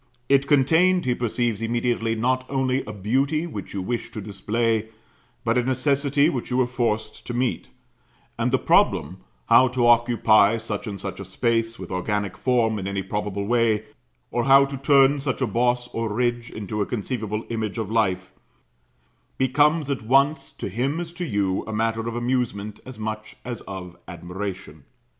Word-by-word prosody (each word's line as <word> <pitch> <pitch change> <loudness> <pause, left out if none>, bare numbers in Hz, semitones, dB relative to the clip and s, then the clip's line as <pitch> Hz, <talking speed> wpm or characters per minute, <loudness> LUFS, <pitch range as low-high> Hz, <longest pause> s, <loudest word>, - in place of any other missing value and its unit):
It 140 0 +4
contained, 160 +6 +4
he 125 - +2
perceives 120 -2 -1
immediately, 115 0 0
not 130 +3 0
only 130 -1 0
a 105 - -6
beauty 135 - 0
which 125 -12 -7
you 95 - -2
wished 120 +4 -4
to - - -3
display, 110 +3 -1 0.6
but 115 +2 +2
a - - +1
necessity 140 +3 +2
which 135 -8 -2
you 125 - 0
were 130 - +4
forced 120 -3 -2
to 120 - -4
meet; 125 0 -1 0.7
and - - 0
the - - +4
problem, - - +2 0.3
how 130 - +6
to 125 -1 0
occupy 115 -2 +4
such 110 0 -5
and 100 -2 -5
such 95 +1 -6
a - - -5
space 115 +3 0
with 95 -1 -8
organic 100 +1 -2
form 115 -4 +1
in 95 - -4
any 100 -1 -2
probable 100 +1 -3
way, 115 -1 +2 0.5
or 120 - 0
how 135 0 +7
to 140 0 -6
turn 140 +1 +4
such 135 -2 -2
a 130 - +1
boss 120 +2 +1
or 115 -1 -3
ridge 120 +1 -1
into 105 0 -4
a 100 - -1
conceivable 110 -2 -3
image 110 -2 -3
of 110 -2 -3
life, 110 -5 0 1.1
becomes 145 +3 +2
at 135 - -2
once, 140 +5 +2
to - - -5
him 130 - -1
as 170 -1 -6
to 175 0 -4
you, 100 - 0
a - - -4
matter 115 +1 -1
of 115 - -4
amusement 120 -4 -2
as 130 -3 -9
much 110 0 -5
as 120 -1 -5
of 90 -3 -7
admiration. 90 -3 -7
115 Hz, 175 wpm, -24 LUFS, 105-130 Hz, 1.1 s, how